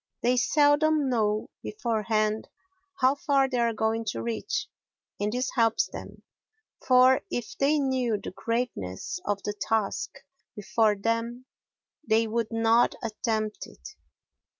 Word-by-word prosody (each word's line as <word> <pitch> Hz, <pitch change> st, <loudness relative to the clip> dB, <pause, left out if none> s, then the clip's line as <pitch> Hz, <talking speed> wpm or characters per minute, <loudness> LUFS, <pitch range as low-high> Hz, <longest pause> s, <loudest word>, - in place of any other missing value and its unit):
They 245 Hz, +1 st, +3 dB
seldom 290 Hz, +2 st, +3 dB
know 215 Hz, -3 st, 0 dB
beforehand 215 Hz, -1 st, -1 dB, 0.5 s
how 260 Hz, +1 st, +5 dB
far 280 Hz, -2 st, +2 dB
they 255 Hz, -2 st, -2 dB
are 235 Hz, -1 st, +2 dB
going 220 Hz, +1 st, -1 dB
to 215 Hz, -, -3 dB
reach, 425 Hz, -, -2 dB, 0.5 s
and 210 Hz, +1 st, 0 dB
this 250 Hz, +2 st, -1 dB
helps 230 Hz, -3 st, +2 dB
them; -, -, -10 dB, 0.6 s
for 255 Hz, 0 st, +5 dB
if 240 Hz, -2 st, -4 dB
they 285 Hz, +3 st, +3 dB
knew 260 Hz, -5 st, 0 dB
the 200 Hz, -, -7 dB
greatness 200 Hz, -, -3 dB
of 205 Hz, -1 st, -2 dB
the 205 Hz, -, -2 dB
task 210 Hz, 0 st, -1 dB, 0.5 s
before 210 Hz, +1 st, +2 dB
them 230 Hz, +4 st, -2 dB, 0.6 s
they 225 Hz, -4 st, +2 dB
would 225 Hz, 0 st, -1 dB
not 225 Hz, +1 st, +3 dB
attempt 215 Hz, -1 st, -2 dB
it. -, -, -12 dB
230 Hz, 125 wpm, -27 LUFS, 215-255 Hz, 0.6 s, how